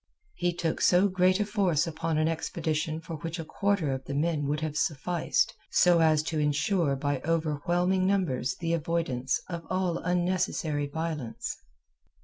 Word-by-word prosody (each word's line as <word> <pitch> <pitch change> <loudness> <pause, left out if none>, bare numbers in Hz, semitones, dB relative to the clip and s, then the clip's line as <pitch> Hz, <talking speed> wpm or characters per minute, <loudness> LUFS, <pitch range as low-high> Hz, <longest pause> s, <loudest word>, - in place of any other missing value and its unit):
He 175 0 0
took 170 -2 -2
so 180 +3 +5
great 185 0 +3
a 210 - +1
force 195 -7 +1
upon 165 -1 -2
an 155 0 +2
expedition 160 -1 -2
for 165 0 -6
which 165 +3 -5
a 165 - -5
quarter 200 -5 0
of 130 0 -4
the 140 - -4
men 150 -1 0
would 150 +1 -1
have 155 -2 -3
sufficed 160 +3 0 0.2
so 175 -1 +5
as 155 -2 +4
to 160 0 -2
ensure 150 +1 +1
by 140 0 -1
overwhelming 170 +4 +1
numbers 160 -11 0
the 165 0 -2
avoidance 155 -6 -1
of 170 -2 -5
all 185 -2 0
unnecessary 175 -4 0
violence. 150 -7 -4
165 Hz, 155 wpm, -28 LUFS, 150-180 Hz, 0.2 s, so